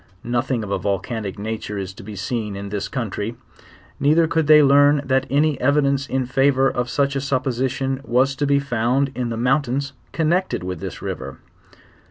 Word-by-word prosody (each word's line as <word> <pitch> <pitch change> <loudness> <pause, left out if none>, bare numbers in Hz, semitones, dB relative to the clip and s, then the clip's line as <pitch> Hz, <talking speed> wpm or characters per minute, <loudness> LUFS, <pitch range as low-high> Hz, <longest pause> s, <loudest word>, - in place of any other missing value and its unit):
Nothing 120 0 -1
of 100 - -6
a 100 - 0
vulcanic 100 +2 -3
nature 105 0 -4
is 95 -1 -5
to - - -12
be 105 +1 -9
seen 105 0 -3
in 100 0 -6
this 100 0 -3
country; 115 -2 -4 0.6
neither 155 +4 +4
could 160 -1 0
iliey 150 -2 +7
iearn 145 0 +4
that 130 0 +1
a.ny 145 0 +2
evidence 140 0 +2
in 130 -1 -1
favor 135 +1 +3
of 125 -2 -1
such 140 +2 0
a 135 - 0
supposition 130 0 -1
was 130 +2 +2
to 145 - 0
be 140 0 +4
found 135 0 0
in 125 -2 -3
the 115 - -3
mountains 135 +2 0 0.2
connected 170 - 0
with 90 -2 -4
this - - -7
river.. - - -5
130 Hz, 180 wpm, -21 LUFS, 110-140 Hz, 0.6 s, iliey